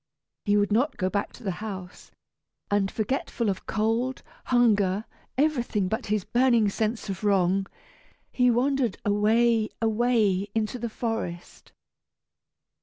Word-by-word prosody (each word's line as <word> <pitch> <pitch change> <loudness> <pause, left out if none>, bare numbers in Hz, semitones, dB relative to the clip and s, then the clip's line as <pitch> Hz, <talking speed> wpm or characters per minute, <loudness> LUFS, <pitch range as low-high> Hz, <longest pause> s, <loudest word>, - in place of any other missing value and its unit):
He 205 -1 +3
would 205 0 +1
not 255 +7 +1
go 185 -1 -1
back 200 0 -1
to - - -14
the 195 - -1
house, 190 -4 -7 0.6
and, 200 -1 +2
forgetful 230 -1 -1
of 190 - -7
cold, 225 +4 0 0.2
hunger, 210 -5 +2 0.3
everything 245 -9 +1
but 220 +6 -3
his 210 -1 0
burning 235 -3 +3
sense 220 +3 -2
of 195 0 -5
wrong, 195 -1 +2 0.6
he 250 -1 +3
wandered 250 -2 +1
away, 220 +2 +3
away, 220 -4 +2
into 220 +2 -1
the 235 0 -3
forest. 220 -7 -5
220 Hz, 125 wpm, -26 LUFS, 200-240 Hz, 0.6 s, He